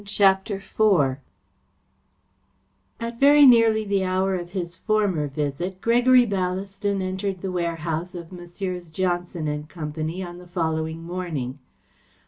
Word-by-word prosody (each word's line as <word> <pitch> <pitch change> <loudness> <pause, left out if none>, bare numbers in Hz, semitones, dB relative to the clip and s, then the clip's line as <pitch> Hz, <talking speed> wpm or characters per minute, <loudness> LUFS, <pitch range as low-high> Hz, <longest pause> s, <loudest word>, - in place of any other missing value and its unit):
CHAPTER 200 0 +2
IV 190 -9 +2 1.8
At 230 0 -5
very 290 +1 +7
nearly 230 -3 +5
the 200 -1 +1
hour 185 +1 0
of 175 -1 -4
his 175 -3 -4
former 200 -7 0
visit, 150 +6 -3
Gregory 245 +3 +5
Ballaston 195 0 -2
entered 190 0 -3
the 190 - -3
warehouse 170 0 -3
of 170 -1 -8
Messrs. 180 0 -6
Johnson 175 -1 -2
and 150 0 -4
Company, 160 +2 -4
on 175 0 -8
the 180 - -13
following 160 -2 -2
morning. 165 -7 -4
185 Hz, 120 wpm, -24 LUFS, 165-200 Hz, 1.8 s, very